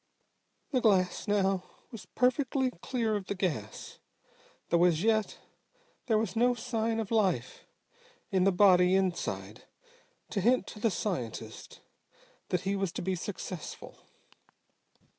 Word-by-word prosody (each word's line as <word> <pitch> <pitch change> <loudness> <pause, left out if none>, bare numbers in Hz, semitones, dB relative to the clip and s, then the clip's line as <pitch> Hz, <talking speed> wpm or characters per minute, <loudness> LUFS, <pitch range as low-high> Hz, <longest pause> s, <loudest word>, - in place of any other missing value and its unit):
The 255 - +1
glass 190 -4 +2
now 195 -2 +1 0.3
was 225 - -10
perfectly 260 +1 +1
clear 230 -4 -1
of 200 -2 -4
the 200 - -2
gas, 150 - -4 0.7
though 170 0 +4
as 170 -1 +2
yet 220 -1 +1 0.7
there 225 -3 +3
was 225 +1 -1
no 245 +2 +3
sign 230 -2 -1
of 220 -1 -4
life 190 - 0 0.6
in 190 -1 +3
the 195 - +4
body 180 -1 +5
inside 190 -2 -2 0.7
to 200 - -1
hint 250 +6 +3
to 210 - -10
the 225 - +2
scientist 120 - -5 0.7
that 180 - 0
he 195 +1 -1
was 195 -3 -1
to - - -4
be 190 +1 0
successful. 185 -1 -6
200 Hz, 130 wpm, -30 LUFS, 180-225 Hz, 0.7 s, body